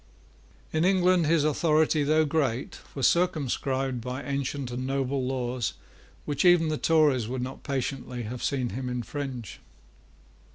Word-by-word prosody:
In 160 +1 +2
England 180 -2 +3
his 160 -1 +3
authority, 155 0 +2
though 155 +2 +3
great, 140 -5 -1 0.2
was 135 -3 0
circumscribed 135 -6 +1
by 125 +3 -5
ancient 140 -2 -3
and 130 +1 -3
noble 135 0 -1
laws 125 -3 -2 0.5
which 145 -1 -1
even 175 -3 +5
the 155 - -1
Tories 150 -8 +3
would 125 +1 -3
not 130 +1 -6
patiently 130 -3 -3
have 120 +3 -6
seen 130 -4 0
him 125 +4 -4
infringe. 125 -1 -5
135 Hz, 135 wpm, -27 LUFS, 125-155 Hz, 0.5 s, even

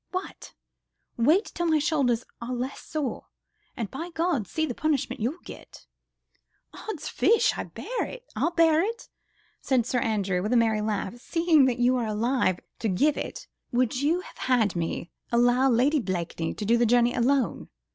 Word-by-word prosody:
What? 370 +1 -6 0.6
Wait 310 - +3
till 345 - -3
my 315 -1 +4
shoulders 275 -6 +1 0.2
are 245 +2 -3
less 255 +3 -4
sore, 300 -5 -4 0.5
and, 225 -4 -4
by 330 +6 -5
Gad, 325 - 0
see 315 - -1
the 250 - -3
punishment 290 -4 -1
you'll 255 +10 -1
get." - - -12 0.9
"Odd's 325 -8 -6
fish! 460 - +3
I'll - - -4
bear - - -4 0.8
it," 460 +5 -4 0.5
said 255 -4 +1
Sir 250 0 0
Andrew, 200 -6 0
with 210 +5 -1
a - - +5
merry 220 -2 +2
laugh, 210 +1 -2
"seeing 325 +1 +3
that 255 -2 +1
you 250 +1 +3
are 235 -3 -1
alive 215 -3 +1 0.2
to 225 - -1
give 280 +11 +2
it.... - - -6 0.3
Would 250 +1 +1
you 325 +5 +2
have - - -14
had 235 -7 +2
me 170 +1 -3 0.2
allow 245 +2 +4
Lady 265 +5 +3
Blakeney 175 -6 -3
to 210 - -5
do 230 +3 +4
the 235 0 +3
journey 240 +1 +4
alone? 255 0 0
245 Hz, 165 wpm, -26 LUFS, 225-300 Hz, 0.9 s, a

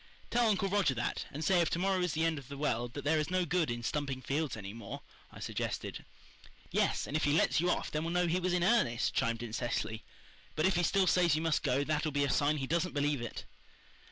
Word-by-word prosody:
"Tell 240 -1 +3
Uncle 200 -1 +1
Roger 195 -9 +2
that, 120 - -2
and 150 +3 -4
say 180 -1 +4
if 165 - +1
to - - -1
morrow 190 +1 +1
is 180 -3 0
the 160 +1 +1
end 160 -2 0
of 135 - -13
the 140 +1 -8
world 120 -4 -1
that 145 - -5
there 155 +2 +2
is 155 - -1
no 185 0 +1
good 170 -2 +1
in 120 0 -3
stumping 140 +1 -2 0.4
any 100 -2 -7
more 115 -3 -7
fields," - - -20 0.3
I - - -12
suggested. - - -4 0.7
"Yes, - - +1
and 145 - -5
if 155 - +1
he 145 - +3
lets 160 0 +3
you 175 - +1
off - - -1
then 155 +1 -1
we'll 165 +1 -2
know 180 0 +2
he 175 +2 +1
was 185 0 0
in 180 -1 +2
earnest," 180 - +2
chimed 115 0 0
in 115 -2 -6
Cecily. 115 -2 -2 0.5
"But 155 - +1
if 190 -1 +3
he 175 - +2
still 190 +2 +3
says 175 -3 +4
you 155 - -1
must 160 -3 +1
go 135 +3 +1
that'll 155 +1 0
be 145 0 +1
a 140 - +1
sign 150 +1 +2
he 135 - -2
doesn't 170 +3 -1
believe 145 -2 +1
it." 120 - -6
155 Hz, 255 wpm, -32 LUFS, 135-175 Hz, 0.7 s, say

